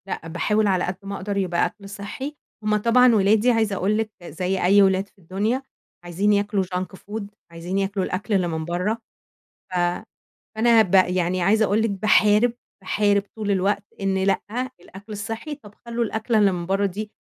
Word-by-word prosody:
لأ، 165 Hz, -, -5 dB
باحاول 210 Hz, +6 st, +1 dB
على 185 Hz, -2 st, +2 dB
قد 180 Hz, -, -2 dB
ما 200 Hz, 0 st, -5 dB
أقدر 200 Hz, +1 st, -4 dB
يبقى 180 Hz, -3 st, +1 dB
أكل 200 Hz, -1 st, -8 dB
صحِّي، 205 Hz, +9 st, -6 dB, 0.3 s
هم 210 Hz, 0 st, +2 dB
طبعًا 235 Hz, +2 st, +5 dB
ولادي 215 Hz, +4 st, +4 dB
عايزة 220 Hz, -3 st, +1 dB
أقول 200 Hz, +3 st, +1 dB
لِك 220 Hz, -1 st, -2 dB
زي 180 Hz, +4 st, -2 dB
أي 200 Hz, +3 st, +6 dB
ولاد 190 Hz, 0 st, +3 dB
في -, -, -34 dB
الدنيا 205 Hz, +8 st, -1 dB, 0.4 s
عايزين 185 Hz, +4 st, +1 dB
ياكلوا 205 Hz, -1 st, +1 dB
junk 185 Hz, +1 st, -4 dB
food 210 Hz, +3 st, -6 dB, 0.3 s
عايزين 170 Hz, +3 st, -4 dB
ياكلوا 195 Hz, -1 st, -1 dB
الأكل 205 Hz, +4 st, -3 dB
اللي 185 Hz, -3 st, +2 dB
من 160 Hz, -1 st, -3 dB
برّه 180 Hz, +6 st, -1 dB, 0.8 s
ف -, -, -5 dB, 0.8 s
فأنا 225 Hz, 0 st, +5 dB
ب 195 Hz, -2 st, -3 dB
يعني 185 Hz, -1 st, +3 dB
عايزة 215 Hz, +5 st, +3 dB
أقول 210 Hz, +2 st, +2 dB
لِك 225 Hz, -, +1 dB
باحارب، 210 Hz, +3 st, +4 dB, 0.3 s
باحارب 200 Hz, +1 st, +2 dB
طول 215 Hz, -2 st, -3 dB
الوقت 200 Hz, +1 st, +1 dB, 0.2 s
إن 190 Hz, -1 st, 0 dB
لأ 195 Hz, -, +2 dB, 0.4 s
الأكل 195 Hz, +4 st, -12 dB
الصحِّي 225 Hz, +8 st, -5 dB
طب 210 Hz, -8 st, -16 dB
خلوا 235 Hz, 0 st, -1 dB
الأكلة 220 Hz, +1 st, 0 dB
اللي 200 Hz, -2 st, +4 dB
من 175 Hz, -1 st, -4 dB
برّه 195 Hz, +2 st, +1 dB
دي 210 Hz, +3 st, -5 dB
200 Hz, 180 wpm, -23 LUFS, 185-215 Hz, 0.8 s, أي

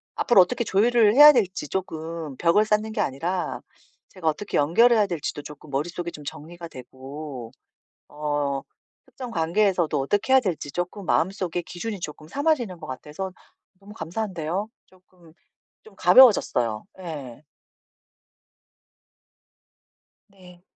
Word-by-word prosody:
앞으로 220 Hz, -6 st, +5 dB
어떻게 235 Hz, +6 st, 0 dB
조율을 220 Hz, +1 st, +3 dB
해야 295 Hz, +1 st, +10 dB
될지 190 Hz, -, 0 dB
쪼끔 160 Hz, -5 st, -5 dB
벽을 175 Hz, +5 st, +3 dB
쌓는 215 Hz, +1 st, 0 dB
게 210 Hz, -, -1 dB
아니라 170 Hz, +7 st, -2 dB, 0.5 s
제가 180 Hz, -4 st, -6 dB
어떻게 195 Hz, +7 st, -4 dB
연결해야 210 Hz, +8 st, +4 dB
될지도 160 Hz, -4 st, -4 dB
쪼끔 150 Hz, 0 st, -12 dB
머릿속에 170 Hz, +5 st, -3 dB
좀 150 Hz, -3 st, -11 dB
정리가 165 Hz, +4 st, -9 dB
되고 130 Hz, -1 st, -9 dB, 0.6 s
어 145 Hz, -2 st, -2 dB, 0.4 s
특정 250 Hz, -2 st, -9 dB
관계에서도 175 Hz, -2 st, +1 dB
어떻게 205 Hz, -, 0 dB
해야 265 Hz, -, +8 dB
될지 175 Hz, -, -3 dB
쪼끔 180 Hz, +2 st, -4 dB
마음속에 185 Hz, -1 st, 0 dB
기준이 195 Hz, +4 st, -6 dB
쪼끔 155 Hz, -1 st, -8 dB
삼아지는 255 Hz, -, -1 dB
것 -, -, -9 dB
같아서 150 Hz, +8 st, -6 dB, 0.5 s
너무 205 Hz, +1 st, -13 dB
감사한데요. 190 Hz, 0 st, -4 dB, 0.2 s
쪼끔 180 Hz, -3 st, -22 dB, 0.5 s
좀 440 Hz, -, -17 dB
가벼워졌어요. 125 Hz, -, +5 dB, 0.2 s
예. 145 Hz, -6 st, -8 dB, 2.8 s
네. 180 Hz, -3 st, -18 dB
175 Hz, 285 characters per minute, -24 LUFS, 150-205 Hz, 2.8 s, 해야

